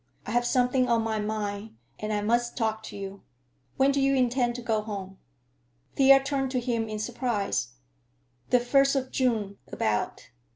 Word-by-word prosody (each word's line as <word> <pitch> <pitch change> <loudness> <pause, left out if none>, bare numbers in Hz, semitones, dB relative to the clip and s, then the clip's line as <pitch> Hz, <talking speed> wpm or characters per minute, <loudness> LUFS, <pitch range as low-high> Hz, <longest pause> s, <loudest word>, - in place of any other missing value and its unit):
I - - -5
have 240 +1 +2
something 250 0 +2
on 230 -1 +3
my 220 -1 -1
mind, 210 0 -3 0.2
and 215 0 -3
I 210 -1 0
must 235 +3 0
talk 220 -2 0
to - - -8
you. 195 0 -7 0.6
When 270 +1 +4
do 275 0 +1
you 275 0 +3
intend 245 -1 +1
to 245 - -6
go 220 -3 +1
home?" 195 -3 -7 0.8
Thea 270 0 +6
turned 270 -1 -1
to 255 - +2
him 235 -2 -1
in 215 - -3
surprise. 215 - -2 0.8
"The 250 - +5
first 275 +3 +3
of 260 -1 -1
June, 220 -6 0
about. 105 +2 -2
235 Hz, 170 wpm, -27 LUFS, 210-255 Hz, 0.8 s, Thea